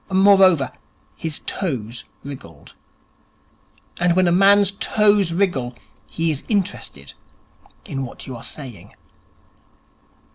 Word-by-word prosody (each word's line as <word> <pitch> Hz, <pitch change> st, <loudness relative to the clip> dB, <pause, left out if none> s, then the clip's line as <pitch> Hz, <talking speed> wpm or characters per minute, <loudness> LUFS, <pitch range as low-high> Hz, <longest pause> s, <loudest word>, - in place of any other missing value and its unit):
Moreover, 190 Hz, -6 st, +5 dB, 0.4 s
his 160 Hz, -2 st, -4 dB
toes 120 Hz, -, -4 dB, 0.2 s
wriggled. 130 Hz, -, -11 dB, 1.3 s
And 175 Hz, -1 st, +2 dB
when 185 Hz, -1 st, +3 dB
a -, -, +3 dB
man's 200 Hz, +2 st, +5 dB
toes 205 Hz, -2 st, +2 dB
wriggle, 165 Hz, -10 st, 0 dB, 0.3 s
he 165 Hz, 0 st, -1 dB
is 145 Hz, -, -4 dB
interested 175 Hz, -, -3 dB, 0.7 s
in 135 Hz, -1 st, -4 dB
what 125 Hz, -, -8 dB
you 130 Hz, -, -7 dB
are 115 Hz, -, -9 dB
saying. 125 Hz, -, -8 dB
165 Hz, 105 wpm, -21 LUFS, 130-195 Hz, 1.3 s, Moreover